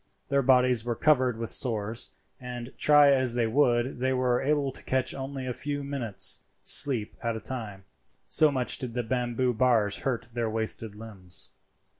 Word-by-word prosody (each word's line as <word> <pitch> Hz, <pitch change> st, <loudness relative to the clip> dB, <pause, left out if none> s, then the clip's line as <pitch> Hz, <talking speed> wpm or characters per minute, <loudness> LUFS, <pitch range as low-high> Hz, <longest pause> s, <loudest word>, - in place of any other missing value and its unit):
Their 140 Hz, 0 st, +2 dB
bodies 125 Hz, -3 st, +3 dB
were 120 Hz, 0 st, -2 dB
covered 130 Hz, -5 st, +2 dB
with 115 Hz, -1 st, -4 dB
sores, 110 Hz, -2 st, -1 dB, 0.3 s
and 125 Hz, 0 st, -8 dB
try 145 Hz, -1 st, +6 dB
as 130 Hz, -3 st, +2 dB
they 120 Hz, -1 st, +1 dB
would 120 Hz, 0 st, +1 dB
they 130 Hz, +1 st, +1 dB
were 125 Hz, -1 st, +1 dB
able 145 Hz, -1 st, 0 dB
to -, -, -11 dB
catch 130 Hz, 0 st, -1 dB
only 135 Hz, 0 st, -6 dB
a 125 Hz, -, -3 dB
few 145 Hz, +3 st, -4 dB
minutes' 135 Hz, -8 st, -1 dB, 0.2 s
sleep 120 Hz, -7 st, +3 dB
at 115 Hz, -1 st, -2 dB
a -, -, -5 dB
time, 110 Hz, -4 st, -7 dB, 0.4 s
so 155 Hz, -1 st, +4 dB
much 130 Hz, -3 st, -1 dB
did 125 Hz, -2 st, -4 dB
the 120 Hz, -, -1 dB
bamboo 125 Hz, +1 st, -1 dB
bars 110 Hz, -4 st, +2 dB
hurt 125 Hz, -3 st, -3 dB
their 115 Hz, -2 st, -1 dB
wasted 110 Hz, -1 st, -2 dB
limbs. 100 Hz, -5 st, -6 dB
125 Hz, 170 wpm, -27 LUFS, 115-130 Hz, 0.4 s, try